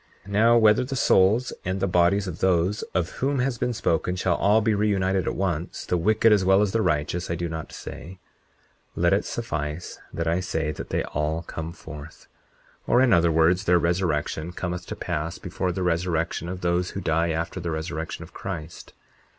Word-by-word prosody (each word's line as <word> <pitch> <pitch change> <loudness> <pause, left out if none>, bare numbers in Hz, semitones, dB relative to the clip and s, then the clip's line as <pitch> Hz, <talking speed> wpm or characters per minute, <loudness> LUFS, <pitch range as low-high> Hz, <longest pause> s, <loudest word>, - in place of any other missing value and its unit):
40:19 100 - -10
Now, 115 +3 +5
whether 110 0 +5
the 135 +2 -4
souls 110 +1 +3
and 95 +1 -2
the 95 - +1
bodies 90 +2 +3
of 90 -3 -6
those 95 +2 +2
of 90 -1 0
whom 140 +2 +1
has 125 -2 -1
been 125 - 0
spoken 90 -5 0
shall 90 -1 +1
all 100 +5 +4
be 110 0 +1
reunited 95 -2 +1
at - - -1
once, 90 -3 -2
the - - 0
wicked 110 +6 +3
as 105 -3 +4
well 95 +2 +5
as 100 - 0
the 115 - +1
righteous, 85 -1 -1
I 85 - 0
do 85 +1 -3
not 80 -1 -6
say; 95 +2 -9 0.8
let - - +3
it - - +1
suffice; 75 +2 -4
that 85 - -3
I 85 +2 +2
say 80 -4 -2
that - - -8
they - - 0
all 75 +2 -2
come 80 -1 -6
forth; 75 -2 -11 0.6
or - - +4
in 130 -2 +5
other 85 -1 +4
words, 85 +4 +3
their 90 0 +5
resurrection 85 -1 -1
cometh 90 0 -4
to - - -5
pass 80 +3 -3
before 90 - -3
the 90 +1 -3
resurrection 85 -1 -1
of 90 0 -5
those 90 +1 0
who - - -5
die 85 0 +1
after 80 +3 -2
the 85 -1 -4
resurrection 80 +1 -4
of 85 - -14
Christ. 85 -3 -7
90 Hz, 200 wpm, -25 LUFS, 80-95 Hz, 0.8 s, Now